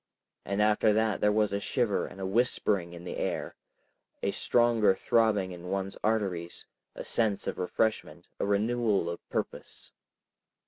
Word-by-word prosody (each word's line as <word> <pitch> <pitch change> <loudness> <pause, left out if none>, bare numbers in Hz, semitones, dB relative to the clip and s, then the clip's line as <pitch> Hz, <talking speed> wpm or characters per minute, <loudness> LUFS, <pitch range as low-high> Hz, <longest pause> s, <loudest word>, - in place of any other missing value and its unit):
And 100 +2 +1
after 105 0 +3
that 110 0 +1
there 105 - +4
was 105 -1 +1
a 100 - 0
shiver 115 -1 0
and 95 0 -6
whispering 100 -6 +1
in 85 0 -10
the 90 - -6
air, - - -3 0.7
a - - +1
stronger 115 -5 +3
throbbing 105 -4 +2
in 90 0 -9
one's 95 0 -2
arteries, 95 -6 -1 0.3
a - - -6
sense 110 -4 +1
of - - -3
refreshment, 110 +4 -1
a - - 0
renewal 105 -3 +1
of 85 - -6
purpose. - - -5
105 Hz, 145 wpm, -29 LUFS, 95-110 Hz, 0.7 s, there